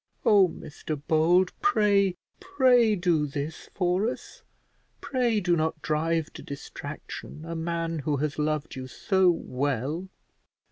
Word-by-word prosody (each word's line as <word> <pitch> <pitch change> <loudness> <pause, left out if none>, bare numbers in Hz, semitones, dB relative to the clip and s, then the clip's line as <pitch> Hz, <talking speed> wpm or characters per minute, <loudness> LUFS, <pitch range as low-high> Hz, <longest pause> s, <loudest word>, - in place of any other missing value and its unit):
Oh, 200 -3 +6
Mr 155 -2 -6
Bold, 175 +4 +4
pray, 205 - +3 0.2
pray 255 - +4
do 170 -5 +1
this 145 +2 -5
for 185 +4 +1
us; - - -9 0.6
pray 245 -5 0
do 175 -3 +2
not 160 -1 -1
drive 160 +1 0
to - - -9
distraction 145 +2 -8
a 165 0 -5
man 165 0 -2
who 145 0 -1
has 150 +1 -2
loved 155 -1 -1
you 130 0 -6
so 190 +7 +2
well." 145 +2 -2
165 Hz, 130 wpm, -27 LUFS, 150-195 Hz, 0.6 s, Oh